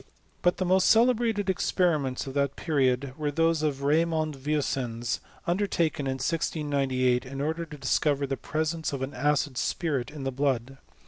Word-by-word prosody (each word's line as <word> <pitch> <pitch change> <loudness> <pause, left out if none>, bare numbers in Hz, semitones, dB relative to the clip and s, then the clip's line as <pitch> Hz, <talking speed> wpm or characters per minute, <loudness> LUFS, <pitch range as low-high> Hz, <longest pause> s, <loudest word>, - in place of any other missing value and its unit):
But 175 - +2
the 185 - -1
most 185 +1 +4
celebrated 225 -3 +3
experiments 160 -8 +1
of 135 - -6
that 140 -1 0
period 135 -4 +1
were 150 -1 0
those 165 +1 +2
of 140 -3 -1
Raimond 155 +1 +1
Vieussens, 130 -5 -2 0.3
undertaken 170 -6 0
in 130 0 -1
169Sj^ 135 -5 0
in 135 +1 -7
order 160 +4 -1
to 150 -1 -9
discover 145 0 +1
the 135 0 -2
presence 155 +2 -2
of 135 -1 -3
an 135 +2 -4
acid 145 -1 0
spirit 145 -8 -1
in 150 -2 -8
the 135 - -1
blood. 135 -1 -1
145 Hz, 155 wpm, -27 LUFS, 135-165 Hz, 0.3 s, most